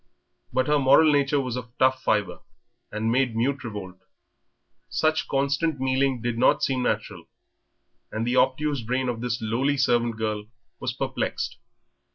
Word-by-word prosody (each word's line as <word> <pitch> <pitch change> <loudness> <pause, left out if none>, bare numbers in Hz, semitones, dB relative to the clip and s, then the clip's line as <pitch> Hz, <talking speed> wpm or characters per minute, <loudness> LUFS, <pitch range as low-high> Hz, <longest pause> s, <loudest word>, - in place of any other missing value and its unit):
But 130 - +1
her 150 +1 +2
moral 140 +3 +6
nature 140 0 +2
was 130 -3 -3
of 120 -1 -8
tough 130 0 +3
fibre, 105 -4 0 0.5
and 110 +2 -1
made 125 -2 +1
mute 135 +5 0
revolt. 100 -5 -7 0.9
Such 155 0 +1
constant 140 +2 0
mealing 130 -1 +1
did 120 -1 -2
not 130 - +3
seem 130 -2 +1
natural, 105 -7 -2 0.9
and 110 +1 -2
the 120 +1 0
obtuse 140 +1 +2
brain 125 +3 -1
of 115 -2 -3
this 120 -1 -2
lowly 130 +6 0
servant 120 -3 +1
girl 105 -1 -3 0.3
was - - -2
perplexed. - - -3
125 Hz, 150 wpm, -25 LUFS, 115-135 Hz, 0.9 s, moral